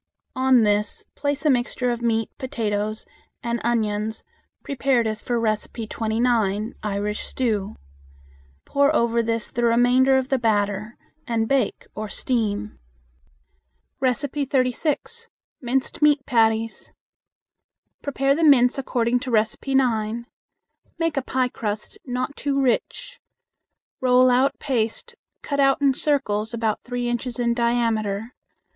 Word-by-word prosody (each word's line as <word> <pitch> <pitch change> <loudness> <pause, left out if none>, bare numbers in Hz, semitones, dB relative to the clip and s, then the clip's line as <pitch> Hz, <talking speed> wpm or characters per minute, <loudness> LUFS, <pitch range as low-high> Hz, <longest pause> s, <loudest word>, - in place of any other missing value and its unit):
On 260 -2 +4
this 210 0 +1
place 285 +1 -2
a - - +5
mixture 245 0 0
of 240 0 -3
meat, 225 -2 0
potatoes, 215 -4 -2 0.4
and 235 0 -2
onions 220 -2 -1 0.4
prepared 265 -3 +1
as 215 0 -2
for 240 -1 -1
No. 220 -2 +2 0.3
29. 220 -2 0 1.9
Pour 280 +2 +2
over 235 0 +2
this 230 -1 -2
the 240 - -2
remainder 245 +3 +4
of 260 0 -1
the 270 - +1
batter 210 -1 0 0.3
and 225 -1 0
bake 265 -5 0
or 215 0 -5
steam. 205 - -2 1.2
36. 275 - -1 0.3
Minced 260 +3 -1
Meat 295 -2 +4
Patties. 225 -1 +1 1.1
Prepare 275 -1 +1
the 325 +3 -1
mince 270 -3 +5
according 245 -2 0
to 255 - -6
No. 220 -2 +4 0.3
9. 235 -3 +1 0.7
Make 330 -2 0
a 275 - +1
piecrust, 240 -5 -3
not 255 +3 -3
too 280 -1 -1
rich. 270 - -1 0.8
Roll 255 0 +5
out 265 +3 +2
paste, 230 -6 -2 0.3
cut 285 -1 -2
out 275 -1 +4
in 280 -2 +3
circles 235 -7 0
about 220 -2 -1
three 245 0 -3
inches 240 0 -3
in 235 -1 +1
diameter. 230 -2 0
240 Hz, 115 wpm, -23 LUFS, 225-265 Hz, 1.9 s, a